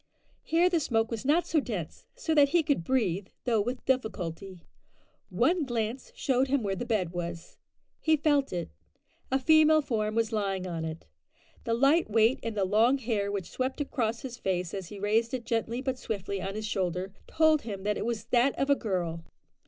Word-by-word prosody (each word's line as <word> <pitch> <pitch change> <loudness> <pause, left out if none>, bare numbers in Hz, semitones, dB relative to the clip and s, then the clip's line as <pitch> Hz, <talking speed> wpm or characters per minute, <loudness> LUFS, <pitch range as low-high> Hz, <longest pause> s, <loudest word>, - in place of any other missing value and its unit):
Here 335 +2 +3
the 355 -2 +2
smoke 225 -6 0
was 230 +2 -4
not 315 +5 +3
so 320 - +2
dense, 205 - -5
so 485 -10 -1
that 290 -2 +5
he 335 +2 +3
could 285 - 0
breathe, 200 -6 0 0.2
though 230 -4 +2
with 245 +4 -4
difficulty. 195 -7 -2 0.7
One 345 0 +2
glance 240 -1 -3
showed 260 0 +1
him 270 -2 +1
where 195 -1 -1
the 240 +6 -5
bed 200 -7 0
was. 170 -1 -6 0.4
He 315 -1 +3
felt 290 -2 +2
it. 175 -2 -4 0.6
A 265 - +4
female 310 +2 +5
form 215 -4 -1
was 230 -1 +1
lying 195 -4 -1
on 165 -3 -3
it. 160 0 -6 0.6
The 230 - +1
light 280 +6 +3
weight 225 +3 +3
and 225 -2 -4
the 195 - +2
long 225 +7 +4
hair 215 -5 -1
which 195 -4 -4
swept 260 +2 -2
across 235 -5 -1
his 245 -2 -7
face 180 -2 -2
as 190 -3 -5
he 205 - -9
raised 225 +5 +1
it 240 -2 -6
gently 230 +1 -1
but 260 -1 -2
swiftly 200 -3 -4
on 195 +2 -4
his 215 0 -4
shoulder, 185 -2 -2
told 315 -2 +3
him 200 -4 -6
that 210 0 0
it - - -3
was 230 -1 -2
that 250 +2 +3
of 275 +1 +1
a - - +6
girl. 175 -8 -2
225 Hz, 195 wpm, -29 LUFS, 195-270 Hz, 0.7 s, a